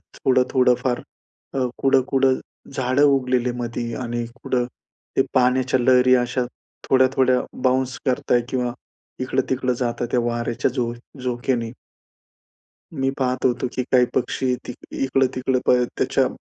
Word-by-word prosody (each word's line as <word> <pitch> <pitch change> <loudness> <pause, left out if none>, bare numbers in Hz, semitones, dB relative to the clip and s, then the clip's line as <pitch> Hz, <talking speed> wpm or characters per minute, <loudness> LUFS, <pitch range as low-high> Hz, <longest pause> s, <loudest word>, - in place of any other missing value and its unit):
थोडं, 130 -1 +3
थोडं 125 -1 +4
फार 125 -2 -1 0.5
अ, - - -1 0.2
कुड-कुड 135 0 +3 0.5
झाडं 130 +1 +1
उगलेले 130 -3 +2
मध्ये 120 -1 -3
आणि 120 -1 -2 0.2
कुड - - -3 0.6
ते - - +5
पाण्याच्या 130 0 +3
लहरी 125 +1 +5
अशा 125 +1 -1 0.5
थोड्या-थोड्या 130 -1 +4 0.2
बाउन्स 130 0 +1
करताय 125 -1 +2
किंवा 125 -2 -1 0.5
इकडं-तिकडं 130 0 0
जाताय, 120 -1 -1
त्या 125 - +2
वार्‍याच्या 120 +1 -1
झो 120 -2 -1 0.3
झोक्याने. 120 -2 -1 1.2
मी 135 -2 0
पाहत 130 -1 -1
होतो, 125 0 +1
की 130 - 0
काही 125 -1 +3
पक्षी 125 0 0
ति - - -4
अ, - - -15
इकडं-तिकडं 130 -1 +1
पळ 125 0 +5 0.2
त्याच्या - - +2
125 Hz, 130 wpm, -22 LUFS, 125-130 Hz, 1.2 s, ते